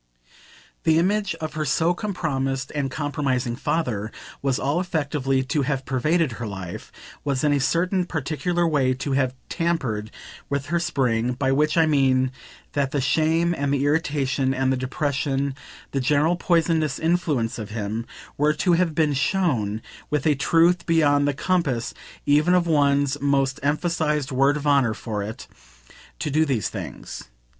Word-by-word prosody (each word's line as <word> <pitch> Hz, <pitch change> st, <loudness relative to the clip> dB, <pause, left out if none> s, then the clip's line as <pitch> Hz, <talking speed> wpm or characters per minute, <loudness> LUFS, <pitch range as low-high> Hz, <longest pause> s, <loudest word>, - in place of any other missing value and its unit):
The 160 Hz, -1 st, +4 dB
image 195 Hz, +1 st, +1 dB
of 160 Hz, -1 st, -5 dB
her 155 Hz, -, -2 dB
so 160 Hz, +4 st, +2 dB
compromised 135 Hz, -, -2 dB
and 145 Hz, -2 st, -1 dB
compromising 130 Hz, -4 st, -1 dB
father 120 Hz, -7 st, -2 dB, 0.3 s
was 135 Hz, -2 st, +1 dB
all 145 Hz, +5 st, 0 dB
effectively 145 Hz, -6 st, 0 dB
to 145 Hz, +3 st, 0 dB
have 135 Hz, -1 st, -1 dB
pervaded 155 Hz, +3 st, +1 dB
her 115 Hz, 0 st, -5 dB
life, 95 Hz, -3 st, -7 dB, 0.3 s
was 140 Hz, -1 st, -1 dB
in 150 Hz, -1 st, +3 dB
a 145 Hz, -, +2 dB
certain 180 Hz, +6 st, +1 dB
particular 170 Hz, +3 st, -1 dB
way 135 Hz, -5 st, +2 dB
to 140 Hz, +2 st, -4 dB
have 130 Hz, -1 st, +1 dB
tampered 135 Hz, -, -1 dB, 0.4 s
with 140 Hz, -1 st, -1 dB
her 170 Hz, -, +3 dB
spring; 125 Hz, -7 st, 0 dB
by 135 Hz, +1 st, 0 dB
which 150 Hz, +4 st, +2 dB
I 165 Hz, -, +6 dB
mean 130 Hz, -4 st, +3 dB, 0.4 s
that 140 Hz, -2 st, 0 dB
the 145 Hz, -, -1 dB
shame 160 Hz, +5 st, +2 dB
and 140 Hz, -2 st, -1 dB
the 140 Hz, 0 st, +1 dB
irritation 140 Hz, -3 st, +1 dB
and 130 Hz, 0 st, +1 dB
the -, -, +1 dB
depression, 140 Hz, +1 st, -1 dB, 0.4 s
the 135 Hz, -, -1 dB
general 150 Hz, +5 st, +2 dB
poisonous 165 Hz, -3 st, +1 dB
influence 150 Hz, -9 st, 0 dB
of 110 Hz, -1 st, -6 dB
him, 110 Hz, +1 st, -4 dB, 0.3 s
were 150 Hz, +1 st, +3 dB
to 175 Hz, +4 st, +1 dB
have 170 Hz, -2 st, +1 dB
been 155 Hz, -3 st, +2 dB
SHOWN, 130 Hz, -, 0 dB, 0.3 s
with 150 Hz, -3 st, -1 dB
a 155 Hz, -, +5 dB
truth 165 Hz, +4 st, +3 dB
beyond 145 Hz, -4 st, +3 dB
the 145 Hz, -, +1 dB
compass 140 Hz, -9 st, 0 dB, 0.3 s
even 150 Hz, +5 st, +4 dB
of 180 Hz, -1 st, +3 dB
one's 145 Hz, -3 st, +2 dB
most 135 Hz, -2 st, +1 dB
emphasised 150 Hz, -1 st, 0 dB
"word 135 Hz, +3 st, +3 dB
of 150 Hz, -, -6 dB
honour" 135 Hz, -6 st, +3 dB
for 110 Hz, -4 st, -4 dB
it, 105 Hz, +3 st, -6 dB, 0.7 s
to 150 Hz, -, -3 dB
do 155 Hz, +3 st, +3 dB
these 130 Hz, -, 0 dB
things. -, -, -7 dB
145 Hz, 160 wpm, -24 LUFS, 130-160 Hz, 0.7 s, I